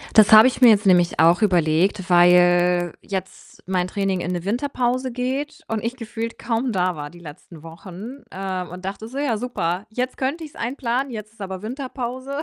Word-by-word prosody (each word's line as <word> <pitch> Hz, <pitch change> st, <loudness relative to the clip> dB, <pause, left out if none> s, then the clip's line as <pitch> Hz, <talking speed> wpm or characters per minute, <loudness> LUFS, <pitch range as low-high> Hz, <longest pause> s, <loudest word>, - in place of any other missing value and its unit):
Das 215 Hz, -1 st, +7 dB
habe 215 Hz, +3 st, +10 dB
ich 260 Hz, -, -2 dB
mir 250 Hz, -, +9 dB
jetzt 215 Hz, -1 st, +4 dB
nämlich 180 Hz, -2 st, +3 dB
auch 170 Hz, +3 st, +5 dB
überlegt, 180 Hz, +1 st, +1 dB
weil 175 Hz, 0 st, +4 dB
jetzt 190 Hz, -1 st, -7 dB
mein 180 Hz, -1 st, -1 dB
Training 195 Hz, -1 st, -1 dB
in 175 Hz, -, -3 dB
'ne 175 Hz, -1 st, -4 dB
Winterpause 250 Hz, +3 st, -1 dB
geht 270 Hz, +5 st, -3 dB
und 220 Hz, -1 st, -2 dB
ich 235 Hz, +2 st, -3 dB
gefühlt 230 Hz, -1 st, -6 dB
kaum 235 Hz, +1 st, -2 dB
da 185 Hz, -1 st, 0 dB
war 145 Hz, 0 st, -6 dB
die 175 Hz, -, -15 dB
letzten 160 Hz, 0 st, -12 dB
Wochen, 185 Hz, +10 st, -10 dB
ähm, 185 Hz, -1 st, -4 dB
und 180 Hz, +1 st, -10 dB
dachte 195 Hz, +3 st, -6 dB
so: 255 Hz, +4 st, -9 dB
„Ja 280 Hz, -6 st, 0 dB
super, 200 Hz, -6 st, -3 dB
jetzt 250 Hz, +3 st, -3 dB
könnte 280 Hz, +5 st, -2 dB
ich's 305 Hz, -, -11 dB
einplanen, 250 Hz, +2 st, -2 dB
jetzt 215 Hz, -2 st, -7 dB
ist 225 Hz, -, -16 dB
aber 190 Hz, -1 st, -6 dB
Winterpause.“ 260 Hz, +3 st, -5 dB
210 Hz, 190 wpm, -22 LUFS, 180-250 Hz, -, habe